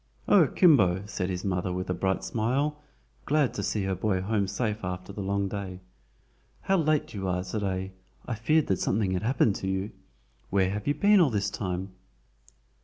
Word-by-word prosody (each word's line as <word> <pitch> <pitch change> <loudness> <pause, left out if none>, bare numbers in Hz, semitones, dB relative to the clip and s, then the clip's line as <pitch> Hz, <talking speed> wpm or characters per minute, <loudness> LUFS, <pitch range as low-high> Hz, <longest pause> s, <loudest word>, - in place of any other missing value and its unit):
"O, - - +6
Kimbo!" 100 - +4
said 95 -3 -3
his 90 0 -4
mother 90 -1 -1
with 90 +1 -3
a 90 - 0
bright 95 +2 -1
smile, 140 +7 -1 0.4
glad 145 -3 +2
to - - -3
see 100 +1 -1
her 95 0 -1
boy 95 +1 0
home 100 +1 0
safe 105 +1 -2
after 90 +1 -5
the 100 - -5
long 100 0 0
day. 95 -2 -5 0.8
"How 195 - +2
late 155 -3 +1
you 95 -2 -3
are 90 0 -1
to 95 +4 -4
day. 95 -1 -2 0.3
I 125 - -3
feared 150 +8 +2
that 95 - 0
something 100 -1 0
had 90 - -1
happened 115 -3 +2
to 95 - -4
you. 95 +2 -2 0.6
Where 95 -1 +2
have 105 +1 -4
you 145 - +2
been 205 +6 +5
all 165 -6 +5
the 105 -4 0
time?" 95 -1 -3
100 Hz, 190 wpm, -27 LUFS, 95-115 Hz, 0.8 s, O